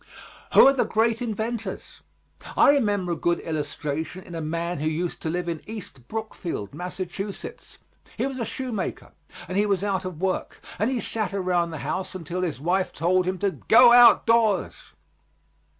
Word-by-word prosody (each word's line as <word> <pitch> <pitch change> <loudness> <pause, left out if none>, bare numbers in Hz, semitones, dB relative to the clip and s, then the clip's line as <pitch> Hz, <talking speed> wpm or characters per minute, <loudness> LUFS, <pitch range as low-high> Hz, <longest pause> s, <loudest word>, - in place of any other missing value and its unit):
Who - - +10
are 275 - +7
the 270 - +2
great 230 +1 +1
inventors? 220 -2 -4 0.6
I - - +7
remember 205 -10 +1
a - - 0
good 170 +1 0
illustration 155 +3 -4
in 175 - -12
a 165 - -4
man 170 +2 -3
who 155 - -1
used 165 +2 -2
to 160 - -2
live 175 +1 -2
in 165 -3 -3
East 200 - -9
Brookfield, 200 - -5
Mass. 180 +1 -6
He 195 +6 -7
was 270 -1 -4
a - - -1
shoemaker, 235 -3 -4 0.4
and 185 - -5
he 210 - +2
was 200 -1 +1
out 195 -2 -1
of 185 -4 -6
work, 190 0 -2 0.2
and 215 - +2
he 255 -3 -1
sat 215 -3 -2
around 180 -3 +1
the 160 - -6
house 185 +5 -3
until 180 +1 -4
his 170 -7 -2
wife 180 +5 0
told 180 +3 +1
him 185 0 -1
to 200 +1 0
"go 235 +5 +6
out 240 0 +8
doors." 225 -4 +1
185 Hz, 175 wpm, -25 LUFS, 170-220 Hz, 0.6 s, Who